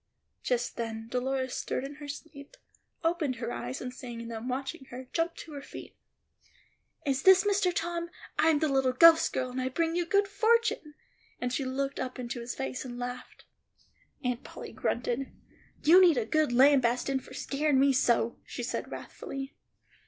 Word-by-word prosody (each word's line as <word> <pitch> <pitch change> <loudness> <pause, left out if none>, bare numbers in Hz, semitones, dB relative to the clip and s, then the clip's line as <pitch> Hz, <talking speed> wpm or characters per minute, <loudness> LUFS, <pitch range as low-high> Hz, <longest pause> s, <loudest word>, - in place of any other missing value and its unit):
Just 245 -1 -1
then 225 -1 -4
Dolores 260 +1 -1
stirred - - -2
in 275 +1 -6
her 295 -1 -9
sleep, 285 - -9 0.5
opened 325 -5 +1
her 230 0 -4
eyes, 120 +2 -5
and 250 0 -5
seeing 235 -2 -7
them 230 +1 -5
watching 265 +3 -4
her, 255 0 -9
jumped 335 0 0
to 325 - -11
her 285 -1 -6
feet. - - -10 1.1
"Is 270 -1 +1
this 380 0 +7
Mr. 405 -2 +2
Tom? 340 0 -2 0.3
I - - +5
am 315 - +4
the 310 +1 +1
little 265 -2 +2
ghost 325 +4 +7
girl, 255 -1 -2
and 255 +1 -3
I 255 - -1
bring 330 +5 0
you 350 -1 0
good 400 +2 +3
fortune;" 435 -6 +1 0.4
and 250 0 -2
she 275 - -1
looked 270 +1 -2
up 255 -1 -4
into 245 -1 -4
his 235 +1 -5
face 265 -1 -4
and 245 -2 -7
laughed. 245 0 -7 0.8
Aunt 250 -1 -1
Polly - - -9
grunted, 245 +2 -2 0.5
"You 350 +5 +8
need 345 -6 +6
a 235 - +1
good 310 +3 +2
lambastin' 260 0 +4
fo' - - -14
skeerin' 285 -1 +1
me 275 0 +5
so," 235 -2 +2
she - - -6
said - - -3
wrathfully. 270 0 -7
270 Hz, 175 wpm, -29 LUFS, 250-320 Hz, 1.1 s, You